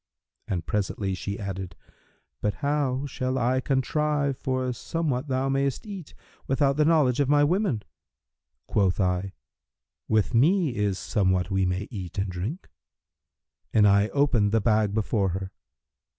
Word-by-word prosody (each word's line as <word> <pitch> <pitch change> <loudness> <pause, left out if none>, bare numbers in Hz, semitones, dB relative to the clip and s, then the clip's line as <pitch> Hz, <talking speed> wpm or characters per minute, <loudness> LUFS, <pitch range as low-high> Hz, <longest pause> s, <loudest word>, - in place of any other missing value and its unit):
And 85 -4 -2
presently 100 +3 -1
she 100 +2 -4
added, 95 -3 -5 0.7
'But 105 - 0
how 140 -2 0
shall 130 -1 -2
I 130 +1 +1
contrive 140 +1 0
for 130 -1 -2
somewhat 145 +1 -2
thou 130 0 0
mayst 135 - 0
eat, 195 -7 -8 0.3
without 135 +1 +2
the 150 +1 +3
knowledge 150 -6 +3
of 140 -2 +2
my 145 0 +5
women?' 155 - +1 0.8
Quoth 95 -3 +1
I, 95 0 0 0.7
'With 110 -3 +1
me 155 +3 +3
is 105 -3 0
somewhat 95 +3 0
we 95 -1 +2
may 90 +3 -2
eat 95 -6 -7
and 95 -1 -1
drink;' 100 - -5 1.0
and 105 -2 +5
I 100 +1 +4
opened 120 -7 +2
the 115 - +3
bag 105 -2 +2
before 105 -2 +1
her. 95 0 -6
115 Hz, 140 wpm, -26 LUFS, 100-140 Hz, 1.0 s, my